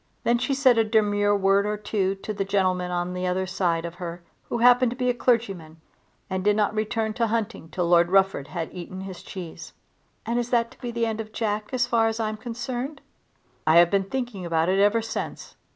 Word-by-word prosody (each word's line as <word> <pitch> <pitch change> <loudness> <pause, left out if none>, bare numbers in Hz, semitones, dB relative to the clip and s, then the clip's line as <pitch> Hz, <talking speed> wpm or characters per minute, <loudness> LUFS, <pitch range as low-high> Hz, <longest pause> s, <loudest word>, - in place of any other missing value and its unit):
Then 240 0 +2
she 275 +2 0
said 260 -4 +4
a - - +5
demure 205 -2 +2
word 195 +1 +3
or 210 0 -1
two 205 -2 -1
to 205 +2 -6
the 200 -1 -1
gentleman 185 -2 0
on 175 0 -2
the 180 0 -2
other 185 +1 0
side 175 -2 -1
of 170 - -5
her 170 0 -6 0.3
who - - -1
happened 245 +1 +5
to 240 - -5
be 250 -1 +2
a - - -3
clergyman, 195 -10 -1 0.5
and 185 0 -3
did 205 +1 +3
not 210 0 +1
return 220 0 -1
to 235 - -1
the - - -1
hunting 225 -6 -3
till 175 +2 -1
Lord 175 0 +5
Rufford 195 -7 +2
had 165 +1 -5
eaten 185 +1 -7
his 190 -2 -8
cheese. 180 -5 -9 0.5
"And 235 +2 0
is 240 0 -2
that 235 -1 +1
to - - -19
be 245 - -4
the 235 0 -1
end 225 -1 -2
of 215 0 -10
Jack 210 -1 -2
as 255 -2 +1
far 230 -2 +2
as 225 0 -2
I'm 215 -1 -2
concerned?" 245 +4 -5 0.7
"I 160 - +5
have 170 0 +6
been 195 -1 +2
thinking 240 -3 -4
about 165 0 +1
it 190 +1 +2
ever 205 +3 +3
since. 225 - -5
205 Hz, 225 wpm, -25 LUFS, 185-230 Hz, 0.7 s, have